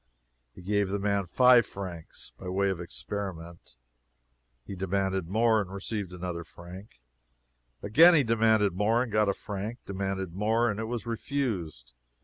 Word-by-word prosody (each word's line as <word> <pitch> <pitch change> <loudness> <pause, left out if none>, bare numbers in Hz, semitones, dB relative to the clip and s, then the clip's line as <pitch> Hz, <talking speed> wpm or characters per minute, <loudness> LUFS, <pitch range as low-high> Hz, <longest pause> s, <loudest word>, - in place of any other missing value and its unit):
He - - -12
gave 100 +1 0
the 100 - -1
man 100 -1 0
five 125 +5 +6
francs, 90 - -8
by 90 - -8
way 100 +1 +1
of 90 -2 -4
experiment. 85 -4 -7 0.9
He - - -7
demanded 95 -1 -1
more, 110 +3 +3
and 95 -2 -7
received 100 -1 -4
another 90 -1 -5
franc. 90 +6 -12 0.8
Again 165 +12 +7
he 150 - +4
demanded 110 -4 +3
more, 110 +6 +2
and 120 - -7
got 105 -1 +2
a - - +2
franc 105 +3 -5
demanded 95 -2 -3
more, 110 +4 +1
and 105 - -5
it 110 - -2
was 120 +1 -4
refused. 105 - -3
100 Hz, 150 wpm, -28 LUFS, 90-110 Hz, 0.9 s, Again